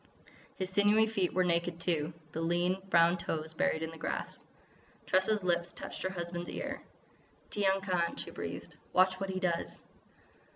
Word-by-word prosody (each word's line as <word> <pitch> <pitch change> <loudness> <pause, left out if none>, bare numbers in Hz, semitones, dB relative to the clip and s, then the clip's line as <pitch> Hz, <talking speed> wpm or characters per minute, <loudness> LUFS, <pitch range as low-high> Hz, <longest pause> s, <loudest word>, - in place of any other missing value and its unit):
His 185 -1 -3
sinewy 205 +3 +5
feet 200 -5 0
were 185 - +2
naked, 170 0 +1
too, 165 -2 +1 0.2
the 160 - -3
lean, 175 +3 +1
brown 170 0 +5
toes 160 -1 -3
buried 160 0 +1
in 160 - -3
the 165 - -11
grass. - - -4 0.6
Tressa's 190 +2 +2
lips 175 -1 +1
touched - - -7
her 185 - 0
husband's 175 -1 -4
ear. - - -4 0.7
"Tiyang 195 -1 +2
Khan," 180 -3 0
she - - -7
breathed. - - -6 0.2
"Watch 185 0 +4
what 195 0 -3
he 185 0 -2
does!" 175 -3 -2
180 Hz, 160 wpm, -32 LUFS, 170-190 Hz, 0.7 s, sinewy